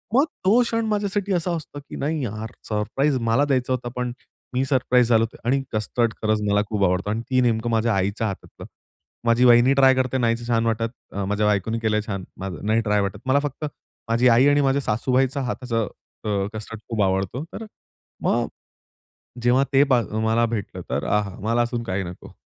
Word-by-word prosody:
मग 275 Hz, +4 st, +5 dB, 0.2 s
तो 220 Hz, +6 st, +5 dB
क्षण 230 Hz, -1 st, -1 dB
माझ्यासाठी 205 Hz, -2 st, -1 dB
असा 175 Hz, 0 st, 0 dB
असतो, 155 Hz, -2 st, -7 dB
की 140 Hz, -, -11 dB
नाही 150 Hz, 0 st, -2 dB
यार 110 Hz, 0 st, -5 dB, 0.2 s
सरप्राईज 130 Hz, +7 st, 0 dB
मला 130 Hz, +6 st, +3 dB
द्यायचा 130 Hz, -2 st, +1 dB
होता, 125 Hz, -1 st, -3 dB
पण 125 Hz, -1 st, -2 dB, 0.4 s
मी 130 Hz, +1 st, +1 dB
सरप्राईज 125 Hz, -3 st, +3 dB
झालो 115 Hz, -1 st, +5 dB
होतो 115 Hz, -, -5 dB
आणि 135 Hz, +2 st, +2 dB
कस्टर्ड 115 Hz, +2 st, 0 dB
खरंच 110 Hz, -1 st, +1 dB
मला 105 Hz, 0 st, +3 dB
खूप 105 Hz, -2 st, 0 dB
आवडतो, 90 Hz, +3 st, 0 dB
आणि 110 Hz, +2 st, -1 dB
ती 130 Hz, -1 st, +3 dB
नेमकं 120 Hz, -1 st, +1 dB
माझ्या 115 Hz, 0 st, +2 dB
आईच्या 100 Hz, +4 st, 0 dB
हातातलं. 100 Hz, -, -8 dB, 0.6 s
माझी 120 Hz, +2 st, +4 dB
वहिनी 120 Hz, +2 st, +6 dB
ट्राय 135 Hz, -1 st, +6 dB
करते 130 Hz, 0 st, 0 dB
नाहीच 115 Hz, -1 st, 0 dB
छान 115 Hz, -1 st, +1 dB
वाटत. 115 Hz, 0 st, 0 dB, 0.2 s
अ, 100 Hz, 0 st, -3 dB
माझ्या 105 Hz, +2 st, 0 dB
बायकोने 105 Hz, +3 st, 0 dB
केलं 110 Hz, -1 st, 0 dB
आहे -, -, +1 dB
छान, 100 Hz, -3 st, -3 dB, 0.4 s
नाही 110 Hz, +2 st, +2 dB
ट्राय 105 Hz, -2 st, +1 dB
वाटत. 100 Hz, +1 st, -3 dB
मला 135 Hz, +2 st, +3 dB
फक्त 145 Hz, +1 st, -4 dB, 0.4 s
माझी 115 Hz, +2 st, +3 dB
आई 120 Hz, +4 st, +5 dB
आणि 145 Hz, 0 st, +4 dB
माझ्या 135 Hz, +1 st, +2 dB
सासूबाईचा 130 Hz, +4 st, +1 dB
हाताचं 120 Hz, -3 st, -2 dB, 0.4 s
अ, -, -, -1 dB, 0.2 s
कस्टर्ड 110 Hz, 0 st, -7 dB
खूप 115 Hz, -3 st, -1 dB
आवडतो. 95 Hz, -, -1 dB
तर -, -, -6 dB
अ, -, -, -9 dB, 0.6 s
मग -, -, +1 dB, 1.0 s
जेव्हा 125 Hz, +3 st, +4 dB
ते 135 Hz, +1 st, +6 dB
ब 130 Hz, -, +6 dB, 0.3 s
मला 115 Hz, +1 st, +3 dB
भेटलं 110 Hz, -3 st, -4 dB
तर -, -, -1 dB
"आहा! 105 Hz, -2 st, 0 dB
मला 115 Hz, +4 st, +1 dB
अजून 120 Hz, 0 st, -2 dB
काही 95 Hz, -2 st, -2 dB
नको." 90 Hz, 0 st, -10 dB
115 Hz, 190 wpm, -23 LUFS, 110-135 Hz, 1.0 s, वहिनी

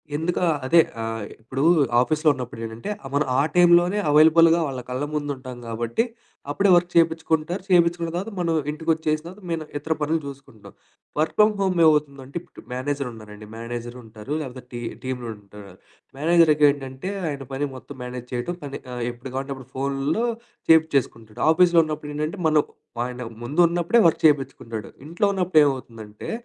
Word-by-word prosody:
ఎందుకు 165 Hz, +3 st, -1 dB
ఆ! -, -, +3 dB, 0.2 s
అదే 170 Hz, +5 st, +5 dB, 0.2 s
ఆహ్, 115 Hz, -1 st, -3 dB, 0.2 s
ఇప్పుడు 130 Hz, +4 st, -3 dB, 0.4 s
ఆఫీసులో 155 Hz, +3 st, +2 dB
ఉన్నప్పుడేంటంటే 115 Hz, -, -6 dB
ఆహ్, 135 Hz, -, -7 dB
మనం 150 Hz, -, +2 dB
ఆ -, -, +5 dB
టైంలోనే 175 Hz, +2 st, +5 dB
అవైలబుల్‌గా 160 Hz, +2 st, +6 dB
వాళ్ళ 130 Hz, -2 st, -5 dB
కళ్ళ 130 Hz, +3 st, -2 dB
ముందు 145 Hz, -1 st, -2 dB
ఉంటాం 130 Hz, -1 st, -9 dB
గాబట్టి 115 Hz, -, -1 dB, 0.5 s
అప్పుడే 200 Hz, +6 st, +2 dB
వర్క్ 175 Hz, 0 st, +2 dB
చేపిచుకుంటారు. 165 Hz, +1 st, +1 dB
చేపించుకున్న 170 Hz, -2 st, +3 dB
తర్వాత 195 Hz, +6 st, -3 dB
మనం 170 Hz, -2 st, 0 dB, 0.2 s
ఇంటికొచ్చేసిన 155 Hz, 0 st, -1 dB
తర్వాత 185 Hz, +5 st, -10 dB
మేము 165 Hz, -2 st, -2 dB
ఇతర 160 Hz, +2 st, -1 dB
పనులు 160 Hz, +2 st, +1 dB
చూసుకుంటాం. 135 Hz, -6 st, -11 dB, 0.5 s
వర్క్ 155 Hz, -, 0 dB
ఫ్రామ్ 210 Hz, 0 st, +6 dB
హోములో 185 Hz, -3 st, +1 dB
ఏమవుతుందంటే 140 Hz, -3 st, 0 dB
ఇప్పుడు 175 Hz, -, -15 dB
మేనేజర్ 140 Hz, +1 st, -2 dB
ఉన్నారండి. 105 Hz, -1 st, -11 dB
మేనేజరుంటారు 120 Hz, 0 st, -7 dB
లేకపోతే 130 Hz, -3 st, -8 dB
టీ 120 Hz, -, -5 dB, 0.2 s
టీమ్‌లుంటారు. 105 Hz, -6 st, -7 dB, 0.4 s
మేనేజర్‍కేంటంటే 150 Hz, -1 st, +3 dB, 0.2 s
ఆయన 140 Hz, -3 st, -4 dB
పని 145 Hz, +2 st, -1 dB
మొత్తం 130 Hz, +2 st, -11 dB
మేనేజ్ 125 Hz, 0 st, -7 dB
చేయటం 125 Hz, +9 st, -3 dB
పని 140 Hz, -1 st, -6 dB
ఆహ్, 120 Hz, -, -4 dB
ఎప్పుడు 120 Hz, +2 st, -10 dB
గావాలంటే 135 Hz, +1 st, -3 dB
అప్పుడు 130 Hz, -1 st, -13 dB
ఫోనులో 140 Hz, -, -1 dB, 0.4 s
చేపించేసుకుంటాడు. 140 Hz, -9 st, +2 dB
ఆఫీసులో 170 Hz, 0 st, +5 dB
ఉన్నప్పుడేంటంటే 155 Hz, +3 st, -4 dB
మనం 155 Hz, -1 st, +4 dB, 0.4 s
ఆయన 125 Hz, 0 st, -6 dB, 0.2 s
ముందు 145 Hz, +8 st, -3 dB
ఉన్నప్పుడే 175 Hz, +7 st, +2 dB
వర్క్ 165 Hz, -, 0 dB
చేపించుకుంటాడు. 130 Hz, -7 st, 0 dB, 0.2 s
ఇంట్లో 170 Hz, +5 st, 0 dB
ఉన్నప్పుడు 180 Hz, -4 st, +3 dB
ఏమవుతుందంటే 115 Hz, -6 st, -5 dB
145 Hz, 145 wpm, -23 LUFS, 125-165 Hz, 0.5 s, అవైలబుల్‌గా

